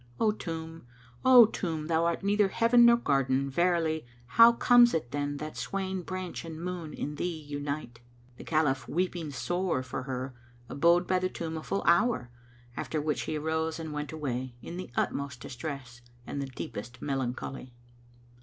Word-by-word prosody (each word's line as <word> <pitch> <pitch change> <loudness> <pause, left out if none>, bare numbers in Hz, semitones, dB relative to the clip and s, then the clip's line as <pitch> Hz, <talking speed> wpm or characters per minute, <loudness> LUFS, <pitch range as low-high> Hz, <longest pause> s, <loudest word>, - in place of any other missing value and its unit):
O 220 - +4
tomb, 165 - -7 0.4
O 255 -3 +9
tomb, 165 -7 -3
thou 165 +1 +1
art 170 +3 -1
neither 205 0 +3
heaven 235 +4 +5
nor 235 0 +7
garden, 135 - +1
verily: 165 0 +1 0.2
* 120 - -27
How 230 +1 +11
comes 240 -1 +5
it 120 -7 -2
then 145 0 -2
that 155 +1 -6
swaying 190 -1 -3
branch 185 -2 -5
and 160 -1 -7
moon 175 -2 -5
in 150 0 -5
thee 170 -3 -3
unite? 145 -4 -4 0.4
The - - -9
Caliph, 140 -5 +1
weeping 175 -2 -1
sore 175 +1 -1
for 130 - -5
her, 130 0 -4 0.3
abode 170 +7 +3
by 185 0 +2
the 185 0 -1
tomb 165 -2 -5
a 160 - -4
full 195 +5 -2
hour, 170 - +3 0.4
after 155 - -2
which 150 0 -1
he 155 - -1
arose 160 +1 -1
and 160 -2 -5
went 150 0 -4
away, 130 -5 -4
in 170 - -8
the 185 - -6
utmost 140 -3 -2
distress 125 -1 -7 0.2
and 140 - -4
the 140 - -3
deepest 120 -2 -7
melancholy. 130 -2 -4
160 Hz, 170 wpm, -29 LUFS, 140-180 Hz, 0.4 s, How